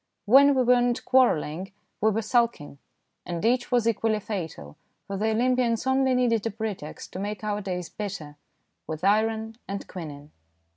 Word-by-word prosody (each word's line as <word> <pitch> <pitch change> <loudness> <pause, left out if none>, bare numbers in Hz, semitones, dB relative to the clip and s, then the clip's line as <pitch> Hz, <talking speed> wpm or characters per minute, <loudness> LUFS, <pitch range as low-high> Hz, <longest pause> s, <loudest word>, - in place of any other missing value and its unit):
When 275 +6 +7
we 260 - +3
were 245 0 +4
not 245 0 0
quarrel 255 -11 +4
ling 180 +6 -6 0.3
we 215 - +4
were 220 +1 -1
sulking, 230 - 0 0.4
and 175 +3 -4
each 245 +2 +1
was 240 -2 +2
equally 220 -1 +1
fatal, 165 - -6 0.3
for 195 - -5
the 215 +3 0
Olympians 240 0 +1
only 265 0 +2
needed 235 -4 +2
a - - 0
pre 220 0 -3
text 150 -4 -10
to - - -5
make 205 +2 -4
our 210 -1 -1
days 180 -3 -4
bitter 185 -8 -6 0.5
with 155 -1 -5
iron 220 +2 +1
and 200 0 -5
quinine. 150 -4 -8
215 Hz, 175 wpm, -26 LUFS, 185-240 Hz, 0.5 s, When